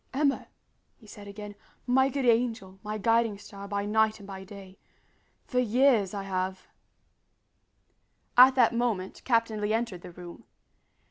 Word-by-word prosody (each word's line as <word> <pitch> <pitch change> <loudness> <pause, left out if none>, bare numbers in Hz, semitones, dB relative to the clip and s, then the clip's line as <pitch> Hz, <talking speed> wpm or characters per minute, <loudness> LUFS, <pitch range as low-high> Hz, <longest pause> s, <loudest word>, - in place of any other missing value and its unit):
"Emma," 280 -1 +1 0.5
he 225 - -20
said 205 -1 -12
again, 205 0 -8 0.3
"my 265 +2 +3
good 275 0 -2
angel, 225 -5 0
my 210 0 -4
guiding 225 0 +1
star 200 -1 -10
by 200 0 -2
night 220 +1 +1
and 200 - -12
by 190 -1 -8
day 195 -1 -12 0.7
for 250 - -1
years 240 -4 +3
I 200 -1 -5
have 185 -1 -3 0.9
" - - -46
At 260 +1 +8
that 245 -3 +4
moment 230 -6 -2
Captain 230 -3 +1
Lee 210 +1 0
entered 225 -6 -2
the - - -10
room. 175 0 -12
215 Hz, 150 wpm, -28 LUFS, 195-235 Hz, 0.9 s, At